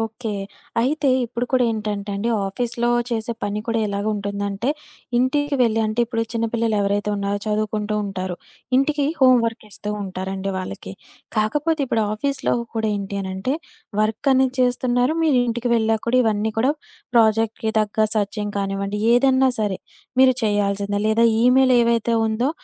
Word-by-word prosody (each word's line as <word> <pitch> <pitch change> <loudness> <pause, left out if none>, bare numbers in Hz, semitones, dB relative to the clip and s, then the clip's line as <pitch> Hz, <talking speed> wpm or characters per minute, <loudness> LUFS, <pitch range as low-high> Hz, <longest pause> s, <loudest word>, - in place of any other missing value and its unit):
Okay. 225 0 -4 0.5
అయితే, 280 +3 +1 0.2
ఇప్పుడు 240 +1 -3
కూడా 255 -1 +4
ఏంటంటే 210 -2 -3
అండి. 225 +4 -1 0.2
ఆఫీస్‌లో 240 +4 -1 0.2
చేసే 230 0 -2
పని 205 +1 -2
కూడా 230 -1 0
ఎలాగ 200 0 -3
ఉంటుందంటే, 200 +4 -2 0.5
ఇంటికి 290 +3 +1
వెళ్లి 225 -1 +2
అంటే, 215 +2 -1
ఇప్పుడు 230 -1 -1
చిన్నపిల్లలెవరైతే 220 -3 0
ఉన్నారో 200 0 -1
చదువుకుంటూ 210 0 -1
ఉంటారు. 185 -2 -4 0.4
ఇంటికి 285 +1 +2 0.2
హోంవర్క్ 235 -4 +4
ఇస్తూ 210 +1 -6
ఉంటారండి 190 +1 -4
వాళ్ళకి. 185 - -6 0.5
కాకపోతే, 295 +9 0
ఇప్పుడు 225 -2 +1
ఆఫీస్‌లో 275 +5 -1 0.2
కూడా 220 -1 0
ఏంటి 200 0 -4
అనంటే 190 +8 -2 0.5
వర్క్ 220 +5 0
అనేది 260 0 +2
చేస్తున్నారు, 250 +2 +2
మీరింటికి 245 -5 +1
వెళ్ళాక 220 -1 +1
కూడా, 255 +2 +3
ఇవన్నీ 215 0 0
కూడా 265 +5 +3 0.4
ప్రాజెక్ట్‌కి 220 -1 +2
తగ్గ 215 +1 +1
సెర్చింగ్ 205 0 -2
కానివ్వండి, 195 +1 -2
ఏదన్నా 265 +1 +4
సరే 200 -3 -1 0.4
మీరు 260 -1 +6
చేయాల్సిందే. 205 -1 0
లేదా, 230 +2 +3 0.2
ఈమెయిల్ 255 +1 +5
ఏదైతే 235 0 +1
ఉందో, 235 +5 0
220 Hz, 135 wpm, -22 LUFS, 205-245 Hz, 0.5 s, మీరు